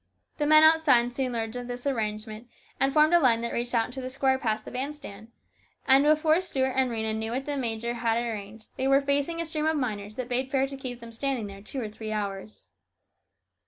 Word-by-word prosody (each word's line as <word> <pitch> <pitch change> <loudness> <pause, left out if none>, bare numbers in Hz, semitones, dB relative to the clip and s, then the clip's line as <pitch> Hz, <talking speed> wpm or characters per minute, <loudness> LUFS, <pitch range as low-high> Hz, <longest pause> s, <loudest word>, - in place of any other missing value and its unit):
The 295 - 0
men 310 +1 +7
outside 290 -7 +5
soon 255 -1 -2
learned 225 0 -3
of 245 0 -5
this 245 +1 -6
arrange 215 -5 -2
ment 220 +2 -10 0.3
and 270 - +2
formed 305 +3 +4
a 345 - +7
line 235 -6 +3
that 235 - -3
reached 240 +1 -1
out 225 -1 +3
into 255 +3 -7
the 255 - -5
square 265 0 +1
past 220 -4 -2
the - - -8
band 270 +4 -3
stand, 220 -7 -11 0.6
and 270 +1 +7
before 310 +3 +3
Stuart 265 -7 -1
and 260 -1 +2
Rhena 220 -2 -2
knew 220 0 -3
what 265 +2 -3
the 290 - -3
major 235 -2 -2
had 230 -1 0
arranged 220 -2 -5
they 265 - 0
were 275 0 +5
facing 285 +4 0
a 335 - -1
stream 310 -1 -2
of 315 -1 +1
miners 215 -5 -4
that 255 -1 -4
bade 255 +1 -1
fair 270 -1 +1
to 275 0 -7
keep 250 -3 -7
them 235 0 -10
standing 250 -1 -2
there 195 -1 -9
two 240 +6 -6
or 230 - -3
three 215 +1 -7
hours. 205 -1 -5
250 Hz, 235 wpm, -27 LUFS, 225-275 Hz, 0.6 s, men